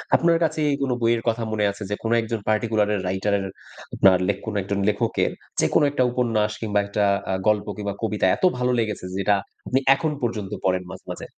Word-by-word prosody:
আপনার 170 0 +4
কাছে 155 -1 0 0.2
কোন 135 -2 0
বইয়ের 115 0 +2
কথা 115 0 +1
মনে 105 -1 +1
আছে, 100 +1 -8
যে 105 - -1
কোন 115 - -1
একজন 115 0 -3
পার্টিকুলার 110 -1 +1
এর 95 - -2
রাইটার 95 +2 0
এর, 95 - -4 0.5
আপনার 95 -1 +6
লেখ 100 -1 +1
কোন 110 - -4
একজন 100 +1 -2
লেখকের 105 - 0 0.3
যেকোন - - +3
একটা 130 -3 +1
উপন্যাস 115 -4 +1
কিংবা 105 -2 +1
একটা 100 +1 -1 0.3
আ - - +1
গল্প 105 -1 +2
কিংবা 100 -1 -3
কবিতা 105 -3 0
এত - - -14
ভালো 125 0 +1
লেগেছে, 105 -4 -2
যেটা 100 +1 +3 0.3
আপনি 130 - +2 0.2
এখন 155 +1 -1
পর্যন্ত 110 -5 -3
পড়েন 90 -1 +1
মাঝে, - - -11
মাঝে? - - -7
105 Hz, 200 wpm, -23 LUFS, 100-115 Hz, 0.5 s, আপনার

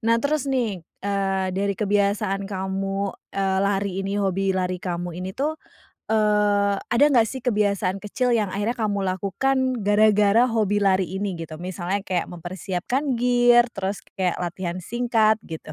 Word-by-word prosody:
Nah, 230 - +5
terus 285 +3 -1
nih 235 -8 -1 0.2
eee, 195 -1 0
dari 200 +1 -1
kebiasaan 200 -1 0
kamu, 195 0 -2 0.2
eee, 190 -1 +1
lari 200 -1 0
ini, 195 +1 -2
hobi 195 -1 0
lari 185 -1 -1
kamu 175 -1 -4
ini 185 +2 -6
tuh. 295 +3 0 0.6
Eee, 210 -2 +3
ada 240 +7 +2
enggak 245 -6 +4
sih 260 +4 -5
kebiasaan 200 -4 0
kecil 245 +3 +1
yang 205 -4 -1
akhirnya 205 +4 -1
kamu 210 -3 -1 0.2
lakukan 255 +6 0
gara-gara 210 +2 +4
hobi 220 -4 +1
lari 190 -3 +2
ini 190 +2 -3
gitu? 160 -1 -7
Misalnya 185 +3 -3
kayak 185 -1 -1
mempersiapkan 190 - -3
gear, 245 0 +5
terus 195 0 -4
kayak 185 -3 -1
latihan 175 0 -4
singkat, 225 -2 +2
gitu. 160 -4 -9
200 Hz, 150 wpm, -23 LUFS, 190-225 Hz, 0.6 s, Nah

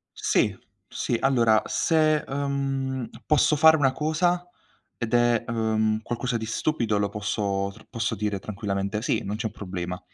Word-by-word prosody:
Sì, 105 - +1 0.3
sì. 120 - -1
Allora 120 -5 +3
se, 155 -2 +2
uhm, 135 -2 -2 0.2
posso 150 0 +4
fare 160 +1 +7
una 135 -3 +2
cosa 175 +5 0 0.5
ed 120 0 -2
è, 120 -1 +3
uhm, 110 -1 0
qualcosa 120 +1 -2
di 110 - -3
stupido 115 -4 0
lo 100 - +1
posso 100 -1 -2
tr - - -17
posso 115 -1 -2
dire 105 -1 -2
tranquillamente: 100 0 -3
"Sì, - - 0
non 100 +2 -3
c'è 110 - -3
un 105 - -4
problema." 90 -3 -5
115 Hz, 155 wpm, -25 LUFS, 105-135 Hz, 0.5 s, fare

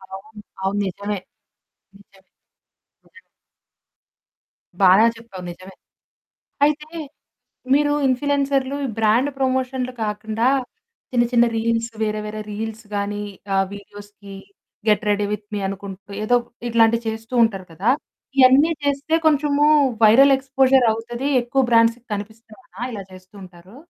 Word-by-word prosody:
అవును. 210 +2 -13 0.2
అవును 195 +1 -1
నిజమే. 200 +2 -4 0.8
నిజమే, 195 -1 -22 0.8
నిజమే. 465 - -20 1.6
బాగా 190 +4 +7
చెప్పావు 210 -5 -11
నిజమే. 185 +2 -13 0.9
అయితే 300 +1 0 0.9
మీరు 290 +1 +3 0.2
ఇన్‌ఫ్లుయెన్సర్లు 275 0 0
ఈ - - -2
బ్రాండ్ 225 +6 +3
ప్రమోషన్లు 260 -1 -1
కాకుండా 215 +2 -1 0.6
చిన్న 240 -2 +3
చిన్న 240 0 +5
రీల్స్ 230 +1 -1
వేరే 215 0 -1
వేరే 215 0 -6
రీల్సు 220 +1 -6
గాని 205 0 -2 0.3
ఆహ్, 195 0 +2
వీడియోస్‌కి 205 0 -12 0.5
గెట్ 210 +1 +3
రెడీ 205 0 +1
విత్ 210 0 -4
మీ - - -2
అనుకుంటూ 195 0 -8
ఏదో 245 +3 +3 0.3
ఇట్లాంటివి 230 0 +3
చేస్తూ 225 +2 -8
ఉంటారు 195 -5 -1
కదా! 190 +8 -1 0.5
ఇయన్నీ 270 +5 +6
చేస్తే 285 +2 0
కొంచెము 295 -1 +3 0.4
వైరల్ 270 +6 +7
ఎక్స్‌పోజర్ 265 -1 +3
అవుతది. 240 +4 -5
ఎక్కువ 240 +3 0
బ్రాండ్స్‌కి 230 +1 +3
కనిపిస్తయనా 220 +4 -10
ఇలా 205 -4 -6
చేస్తూ 185 +1 -15
ఉంటారు? 180 +3 -15
225 Hz, 115 wpm, -21 LUFS, 205-260 Hz, 1.6 s, బాగా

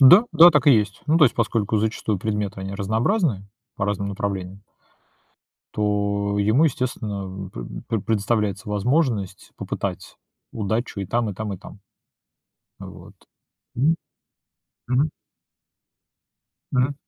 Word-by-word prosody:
Да, 180 - +9
да, 165 +2 +9
так 150 -1 +2
и 145 - +8
есть. 105 -4 +1
Ну, 155 +2 +3
то 155 - +7
есть 125 - +3
поскольку 110 -2 0
зачастую 110 -1 -1
предметы- 105 -1 -3
они 95 +1 -5
разнообразные, 110 - 0 0.3
по 100 - -1
разным 100 -1 -1
направлениям 100 -1 -4 1.1
то 100 -1 0
ему, 110 +9 +3
естественно, 110 -7 -3
м, 95 0 -7
п - - -7 0.2
пре 115 -2 0
предоставляется 105 -1 -1
возможность 105 - 0
попытать - - -5 0.4
удачу 110 0 -2
и - - -2
там, 115 +1 0
и 100 - -7
там, 105 0 -4
и 95 - -6
там. 100 - -13 1.0
Вот. - - -11 0.6
М. 155 +6 +3 0.9
Мгм. 135 +5 +2 1.6
Мгм. 130 +2 +1
105 Hz, 125 wpm, -23 LUFS, 100-125 Hz, 1.6 s, Да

